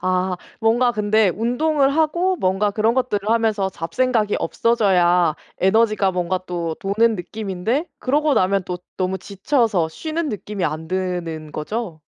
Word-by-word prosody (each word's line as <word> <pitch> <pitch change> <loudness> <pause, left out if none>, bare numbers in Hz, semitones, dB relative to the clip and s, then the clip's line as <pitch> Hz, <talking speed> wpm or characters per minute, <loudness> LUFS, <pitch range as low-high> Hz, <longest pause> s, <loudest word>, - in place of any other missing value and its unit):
아. 185 0 0 0.2
뭔가 240 +2 +3
근데 210 -1 +2
운동을 270 - +1
하고 345 +4 +2
뭔가 195 - +1
그런 220 +3 +1
것들을 215 -5 -1
하면서 220 -4 +1
잡생각이 215 +5 0
없어져야 180 -7 +2 0.2
에너지가 210 0 +3
뭔가 180 0 -1
또 170 -2 -3
도는 220 +4 +2
느낌인데 215 - -3
그러고 290 +2 +1
나면 190 +1 +2
또 180 0 -4 0.2
너무 190 0 -1
지쳐서 200 - 0
쉬는 315 - -3
느낌이 205 -3 -4
안 155 +2 -3
드는 175 -4 -3
거죠? 170 0 -4
205 Hz, 305 characters per minute, -21 LUFS, 180-235 Hz, 0.2 s, 뭔가